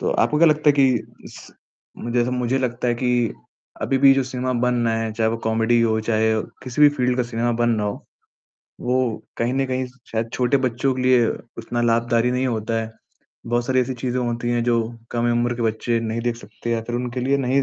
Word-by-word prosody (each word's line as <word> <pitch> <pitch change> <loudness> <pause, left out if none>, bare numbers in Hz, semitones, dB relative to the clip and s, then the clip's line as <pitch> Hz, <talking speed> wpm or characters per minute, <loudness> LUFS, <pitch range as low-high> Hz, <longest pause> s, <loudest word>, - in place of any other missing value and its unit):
तो - - 0
आपको 150 - +2
क्या 170 - +6
लगता 150 0 +2
है 145 - +7
कि 130 -4 0
स - - -13 0.5
मु 120 - -5
जैसे 120 0 +1
मुझे 125 +1 0
लगता 125 -1 -1
है 120 - +2
कि 125 +1 -1 0.7
अभी 135 - +1
भी 135 0 +7
जो 135 - +2
सिनेमा 130 0 -3
बनना 120 -2 +1
है, 110 -1 -2
चाहे 110 0 +1
वो 115 - -2
कॉमेडी 115 +1 +2
हो, 110 -1 +2
चाहे 110 0 +1 0.3
किसी 130 +3 -4
भी 150 - +10
फील्ड 125 -1 +1
का 125 - +2
सिनेमा 120 +1 0
बन 120 0 +3
रहा 105 - -1
हो, 100 - -5 0.7
वो 125 -2 -1
कहीं 120 +2 0
न 135 0 +1
कहीं 130 0 -2 0.3
शायद 115 0 -2
छोटे 125 +2 +2
बच्चों 125 +2 0
के 125 - -3
लिए 125 -2 +4 0.3
उतना 120 +1 -3
लाभकारी 115 +1 +2
नहीं 125 +1 0
होता 115 -2 -2
है। 110 0 -5 0.6
बहुत 120 +1 0
सारी 130 -1 +2
ऐसी 130 +1 -2
चीज़ें 125 +1 -2
होती 120 0 -2
हैं 120 0 +1
जो 120 -1 +2 0.3
कम 120 0 0
उम्र 120 +1 +1
के 120 - -4
बच्चे 115 +1 0
नहीं 115 0 -2
देख 120 0 -1
सकते 115 +1 -8
या 115 - +1
फिर 120 +1 -3
उनके 125 +1 -3
लिए 135 +2 +2
नहीं 135 +1 +2
120 Hz, 220 wpm, -22 LUFS, 115-130 Hz, 0.7 s, भी